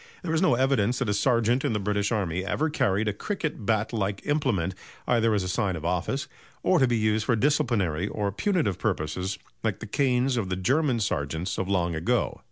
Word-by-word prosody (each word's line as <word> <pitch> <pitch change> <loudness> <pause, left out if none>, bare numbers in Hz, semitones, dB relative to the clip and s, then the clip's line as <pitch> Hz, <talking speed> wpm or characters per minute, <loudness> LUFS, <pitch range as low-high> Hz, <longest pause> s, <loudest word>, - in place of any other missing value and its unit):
There 165 -3 -2
is 160 - +2
no 185 -10 +4
evidence 125 -2 +2
that - - -1
a - - +2
sergeant 120 +3 +2
in - - 0
the 105 - 0
British 100 0 0
army 95 -5 -1
ever 150 +10 -1
carried 105 -7 +1
a 105 - +1
cricket 155 - -4
bat 110 +1 +1
like 100 -3 -2
implement 120 - 0 0.3
either 115 -2 +3
as 100 - 0
a - - -3
sign 95 0 0
of 80 -1 -6
office 90 - -1 0.4
or 185 - +4
to 130 - +4
be 120 -1 +1
used 110 0 +1
for 125 - +2
disciplinary 105 - +1
or 100 -1 -2
punitive 110 - 0
purposes 90 +6 -2 0.3
like - - 0
the - - -6
canes 130 -1 +1
of 100 -5 -1
the 90 - 0
German 130 - +1
sergeants 90 0 -2
of 95 - -2
long 85 -3 +1
ago. 115 +10 0
105 Hz, 205 wpm, -26 LUFS, 95-125 Hz, 0.4 s, no